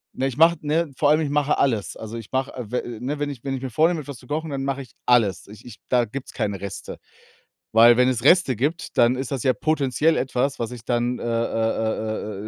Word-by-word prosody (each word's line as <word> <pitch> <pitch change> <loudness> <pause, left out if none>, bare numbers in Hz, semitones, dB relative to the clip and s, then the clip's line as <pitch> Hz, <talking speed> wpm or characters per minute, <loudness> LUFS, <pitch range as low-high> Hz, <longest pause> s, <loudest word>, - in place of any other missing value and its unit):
Ne? 130 - 0
Ich 135 - -5
mach 165 +2 +6
ne? 155 +1 0
Vor 145 - +3
allem, 155 +2 +4
ich 150 - -1
mache 145 0 +1
alles. 115 -7 0
Also, 110 +1 -7
ich 115 -2 -10
mache, 130 0 -1
äh, 125 -5 -7
w 120 -2 -3
ne? 140 +5 -3
Wenn 145 0 -1
ich 135 -5 -8
wenn 135 - -3
ich 130 - -6
mir 135 - -4
vornehme, 160 +6 +2
etwas 140 -3 -8
zu 125 - -17
kochen, 155 +3 -3
dann 135 -2 -3
mache 135 0 -2
ich 125 -5 -12
alles. 115 -6 +2
Ich 105 +2 -14
ich 120 - -11
da 125 -2 +3
gibt's 130 +4 -8
keine 100 -2 -2
Reste. 100 -1 -7 0.8
Weil 115 +1 +7
wenn 125 0 +4
es 120 -2 -2
Reste 160 -3 +5
gibt, 145 - -3
dann 120 +1 +5
ist 130 -1 -4
das 135 -4 -2
ja 130 - +3
potenziell 155 +1 +1
etwas, 130 +1 -1
was 115 0 -3
ich 120 -2 -10
dann, 120 0 0
äh, - - -7
äh, - - -3
äh, 110 -2 -2
125 Hz, 245 wpm, -23 LUFS, 115-145 Hz, 0.8 s, Weil